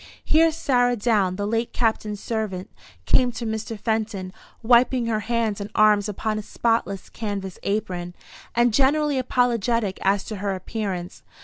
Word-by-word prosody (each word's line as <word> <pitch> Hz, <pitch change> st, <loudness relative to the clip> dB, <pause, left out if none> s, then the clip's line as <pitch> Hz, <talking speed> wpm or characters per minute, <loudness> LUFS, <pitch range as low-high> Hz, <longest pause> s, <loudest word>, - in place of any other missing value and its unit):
Here 325 Hz, +1 st, +4 dB
Sarah 245 Hz, -6 st, +2 dB
Down, 205 Hz, -5 st, +1 dB
the 205 Hz, +1 st, -2 dB
late 225 Hz, +2 st, -1 dB
Captain's 220 Hz, -3 st, 0 dB
servant, 210 Hz, -5 st, -3 dB, 0.3 s
came 250 Hz, -1 st, +4 dB
to 235 Hz, 0 st, -5 dB
Mr. 220 Hz, 0 st, -4 dB
Fenton, 215 Hz, -4 st, -2 dB, 0.3 s
wiping 245 Hz, +1 st, +4 dB
her 225 Hz, -2 st, 0 dB
hands 220 Hz, -2 st, -1 dB
and 200 Hz, -, -5 dB
arms 210 Hz, -1 st, +4 dB
upon 215 Hz, +1 st, -2 dB
a -, -, -4 dB
spotless 210 Hz, -3 st, -1 dB
canvas 200 Hz, -4 st, -5 dB
apron, 180 Hz, -4 st, -3 dB, 0.4 s
and 240 Hz, -1 st, +3 dB
generally 285 Hz, +2 st, +3 dB
apologetic 235 Hz, -5 st, +1 dB
as 195 Hz, 0 st, +2 dB
to 215 Hz, -, -6 dB
her 195 Hz, 0 st, -2 dB
appearance. 185 Hz, -2 st, -5 dB
220 Hz, 145 wpm, -24 LUFS, 200-240 Hz, 0.4 s, Here